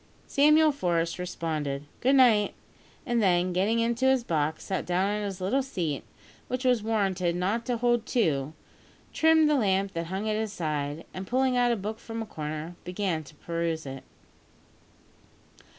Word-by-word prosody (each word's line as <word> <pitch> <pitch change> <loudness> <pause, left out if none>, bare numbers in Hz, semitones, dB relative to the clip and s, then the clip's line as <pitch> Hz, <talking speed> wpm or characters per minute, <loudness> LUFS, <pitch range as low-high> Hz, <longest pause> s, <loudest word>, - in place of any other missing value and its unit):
Samuel 305 +2 +5
Forest 170 -10 -1
responded 155 -6 -3 0.2
"good 265 +3 +3
night," 230 -6 +5 0.5
and 240 -4 +1
then, 180 -2 +2
getting 200 +6 +1
into 235 +2 +1
his 265 -2 +3
box, 155 -5 -1
sat 190 -3 -2
down 180 +2 +1
on 210 - -2
its 195 -2 -4
little 200 +9 +1
seat, 170 - -3 0.4
which 255 +1 -3
was 250 -3 +3
warranted 195 -5 0
not 200 +7 -1
to 245 -2 0
hold 240 -1 +1
two, 155 - 0 0.6
trimmed 320 -1 +5
the 300 - +3
lamp 195 -6 +1
that 165 0 -3
hung 190 +4 -3
at 215 - +1
his 220 -1 -2
side, 150 -3 -3
and, 185 +1 -6
pulling 255 0 +2
out 245 -1 +3
a - - +2
book 215 +1 -5
from 225 0 -6
a - - -8
corner, 155 -1 -6
began 180 -3 -2
to 150 - -15
peruse 165 0 -3
it. 135 0 -7
195 Hz, 165 wpm, -27 LUFS, 170-240 Hz, 0.6 s, Samuel